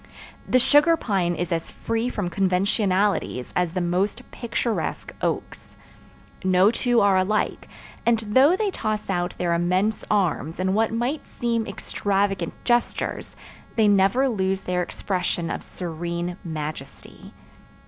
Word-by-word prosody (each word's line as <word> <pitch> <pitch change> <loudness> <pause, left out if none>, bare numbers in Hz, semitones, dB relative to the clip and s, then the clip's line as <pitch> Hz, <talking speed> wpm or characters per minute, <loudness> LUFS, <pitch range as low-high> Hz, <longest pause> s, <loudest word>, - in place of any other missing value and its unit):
The 255 - +5
sugar 295 +6 +5
pine 185 - 0
is 175 +1 -3
as 165 -1 -1
free 230 +2 -2
from 190 -7 -3
conventionalities 195 - +1
as 180 -1 0
the 185 - +1
most 180 +4 0
picturesque 235 -1 -3
oaks. - - -4 0.7
No 185 +2 +4
two 240 0 +2
are 200 -2 +4
alike, 200 +3 0 0.4
and 235 -1 +3
though 260 - +4
they 410 0 0
toss 215 - -2
out 175 -1 -1
their 175 -1 0
immense 185 +5 +1
arms 175 -6 0
in 190 +1 +1
what 220 +2 +2
might 240 +6 -1 0.2
seem 230 -2 0
extravagant 195 -2 -1
gestures 240 -1 -1 0.4
they 220 -2 +4
never 200 +7 +4
lose 190 -5 0
their 180 -1 -1
expression 175 -2 -2
of - - -3
serene 170 0 -4
majesty. 155 -4 -7
195 Hz, 130 wpm, -24 LUFS, 180-225 Hz, 0.7 s, The